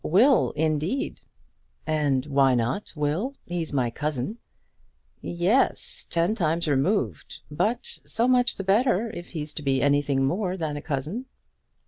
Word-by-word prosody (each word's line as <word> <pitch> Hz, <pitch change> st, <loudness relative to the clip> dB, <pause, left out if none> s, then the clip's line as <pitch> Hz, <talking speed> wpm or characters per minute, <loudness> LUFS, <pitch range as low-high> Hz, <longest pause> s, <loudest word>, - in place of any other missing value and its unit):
"Will, 240 Hz, -, +4 dB
indeed!" 160 Hz, -, -1 dB, 0.6 s
"And 145 Hz, -4 st, +1 dB
why 135 Hz, -3 st, +3 dB
not 120 Hz, -, -1 dB
Will? 160 Hz, -, -1 dB
He's 175 Hz, -2 st, -3 dB
my 125 Hz, -4 st, 0 dB
cousin." 150 Hz, -, -3 dB, 0.8 s
"Yes; 180 Hz, +10 st, 0 dB
ten 170 Hz, +5 st, +1 dB
times 170 Hz, -5 st, 0 dB
removed. 140 Hz, -, 0 dB
But 215 Hz, +11 st, -1 dB
so 235 Hz, +2 st, +1 dB
much 250 Hz, -1 st, +3 dB
the 195 Hz, -, -4 dB
better 220 Hz, +2 st, +2 dB
if 175 Hz, -1 st, -9 dB
he's 150 Hz, -2 st, -5 dB
to 150 Hz, -, -5 dB
be 135 Hz, -2 st, +1 dB
anything 140 Hz, -1 st, +2 dB
more 185 Hz, +5 st, -1 dB
than 155 Hz, -4 st, -2 dB
a 145 Hz, -, -5 dB
cousin." 155 Hz, -, -3 dB
160 Hz, 135 wpm, -26 LUFS, 145-205 Hz, 0.8 s, Will